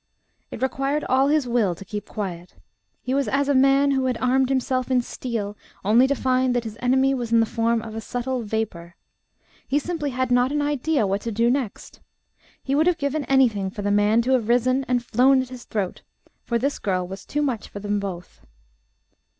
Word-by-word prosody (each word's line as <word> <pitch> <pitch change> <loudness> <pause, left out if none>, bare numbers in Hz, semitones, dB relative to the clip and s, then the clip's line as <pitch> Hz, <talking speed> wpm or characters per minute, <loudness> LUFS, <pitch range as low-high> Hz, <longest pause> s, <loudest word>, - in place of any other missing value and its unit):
It - - -6
required 275 +3 -1
all 265 +2 +2
his 295 -3 +2
will 225 -7 +1
to 195 - -11
keep 210 0 -6
quiet. 180 -4 -6 0.5
He 255 - -2
was 275 0 +1
as 280 +1 +1
a 285 - +3
man 275 +1 +4
who 265 -1 +1
had 250 -2 0
armed 260 +1 +2
himself 260 -1 0
in 255 -1 +3
steel, 220 -5 -4 0.3
only 235 +6 +5
to 280 - +1
find 255 -1 +1
that 240 - 0
his 220 -2 -7
enemy 265 +2 +3
was 240 -3 -3
in 230 - +5
the 225 - +4
form 230 0 0
of 220 - -8
a 225 - -5
subtle 245 +2 -3
vapour. 205 -6 -4 0.7
He 280 - +1
simply 300 -1 -2
had 255 -1 -2
not 245 +2 +3
an 295 - 0
idea 290 -3 0
what 195 +1 -1
to 230 - -4
do 230 +3 +2
next. 255 -6 -4 0.6
He 270 - -2
would 310 +4 +3
have 355 -2 +3
given 285 -1 -2
anything 230 -8 +2
for 200 +2 -7
the 205 - 0
man 205 +3 +3
to 255 - 0
have 240 -4 +1
risen 255 +2 +2
and 245 -1 0
flown 260 +4 +4
at 255 - -11
his 250 -2 -10
throat, 200 -4 -3 0.4
for 235 - 0
this 280 +5 -1
girl 185 -3 -1
was 190 +1 -8
too 295 0 -2
much 245 -7 -2
for - - -9
them 205 0 -1
both. 185 -3 -7
250 Hz, 210 wpm, -23 LUFS, 215-270 Hz, 0.7 s, only